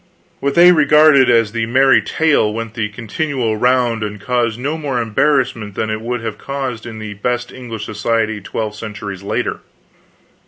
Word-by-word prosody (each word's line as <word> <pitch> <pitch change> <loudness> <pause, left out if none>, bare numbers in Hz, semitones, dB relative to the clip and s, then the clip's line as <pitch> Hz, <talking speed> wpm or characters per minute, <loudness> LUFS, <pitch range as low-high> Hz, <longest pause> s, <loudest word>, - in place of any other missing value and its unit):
What 140 0 -1
they 175 +1 +8
regarded 150 -3 +5
as 115 -3 +3
the 115 0 -2
merry 130 +2 +4
tale 155 -9 +1
went 115 0 -5
the 105 -2 -2
continual 115 +2 -2
round 125 -1 +1
and 105 -1 -4
caused 120 +1 -1
no 145 +5 -2
more 145 -6 -2
embarrassment 115 -3 0
than 110 - -2
it 110 0 -3
would 120 +1 -3
have 115 -2 -5
caused 130 -5 -5
in 110 -2 -8
the 110 -1 -6
best 120 +4 -3
English 115 -4 -7
society 110 0 -1
twelve 105 +2 -4
centuries 105 -3 -7
later. 100 - -2
115 Hz, 165 wpm, -17 LUFS, 110-130 Hz, -, they